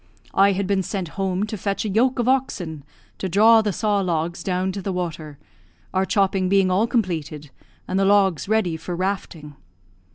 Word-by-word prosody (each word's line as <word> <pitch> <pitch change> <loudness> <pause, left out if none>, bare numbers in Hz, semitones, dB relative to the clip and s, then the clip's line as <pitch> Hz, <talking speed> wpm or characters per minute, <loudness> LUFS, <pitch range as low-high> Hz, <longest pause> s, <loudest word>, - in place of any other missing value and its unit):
I 200 +1 +4
had 195 +1 -1
been 195 0 +1
sent 185 -2 -4
home 190 +1 -2
to 215 - -5
fetch 200 +1 -2
a - - -1
yoke 245 +6 +2
of 240 -1 0
oxen 185 - -1 0.4
to 190 - -3
draw 220 +5 +6
the 210 -1 -1
saw 205 +2 0
logs 175 -2 -2
down 185 0 -1
to 195 +1 -5
the 195 - -3
water, 165 -5 -5 0.6
our 190 0 +1
chopping 195 -2 +1
being 195 -1 +3
all 200 +5 +2
completed, 160 - -2 0.4
and 185 - -1
the 195 - +2
logs 195 -3 +2
ready 205 -7 +1
for 175 +2 -5
rafting. 170 -5 -4
190 Hz, 185 wpm, -22 LUFS, 175-205 Hz, 0.6 s, draw